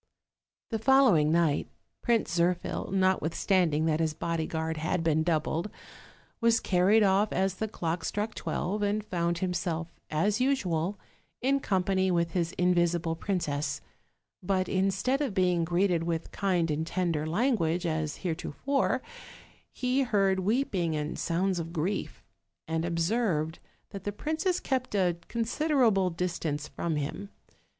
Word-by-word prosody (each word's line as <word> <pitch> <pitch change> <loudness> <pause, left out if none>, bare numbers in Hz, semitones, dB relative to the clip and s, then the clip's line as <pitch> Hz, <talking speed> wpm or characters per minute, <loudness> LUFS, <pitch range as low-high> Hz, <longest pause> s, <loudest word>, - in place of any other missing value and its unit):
The 225 - -1
following 225 - +5
night 165 -3 +2 0.3
Prince 230 -8 +1
Zirphil, 175 +1 0
notwithstanding 185 -3 +2
that 160 -1 +1
his 160 -2 0
bodyguard 160 -1 -2
had 160 +2 -1
been 160 -1 +2
doubled, 165 +3 0 0.7
was 230 -1 +4
carried 195 +4 +3
off 200 +2 +3
as 190 0 +1
the 220 +3 -3
clock 170 -4 -3
struck 210 +5 -2
twelve, 205 +4 -2
and 205 +1 0
found 170 -2 -1
himself, 170 -2 -2 0.2
as 200 +9 +1
usual, 195 - 0 0.4
in 275 +2 +2
company 190 -4 +1
with 170 -2 +1
his 170 -1 -1
invisible 175 -2 +1
princess; 165 -5 -2 0.6
but 185 0 0
instead 195 +8 +1
of 260 -9 -2
being 180 -3 +2
greeted 175 0 +1
with 165 -1 -3
kind 180 -5 0
and 155 +2 -2
tender 170 -4 -1
language, 180 -4 +1
as 155 -1 -2
heretofore, 220 - -1 0.7
he 255 +2 0
heard 195 -6 +2
weeping 190 - 0
and 150 0 -3
sounds 180 +2 0
of 165 - -3
griei, 170 +4 -2 0.6
and 160 0 -1
observed 170 -2 0 0.3
that 195 -2 -7
the 205 - -2
princess 315 - -1
kept 255 -5 -2
a 180 -3 +2
considerable 235 - +2
distance 165 -4 -3
from 170 -2 -3
him. 150 +7 -4
180 Hz, 130 wpm, -29 LUFS, 165-205 Hz, 0.7 s, following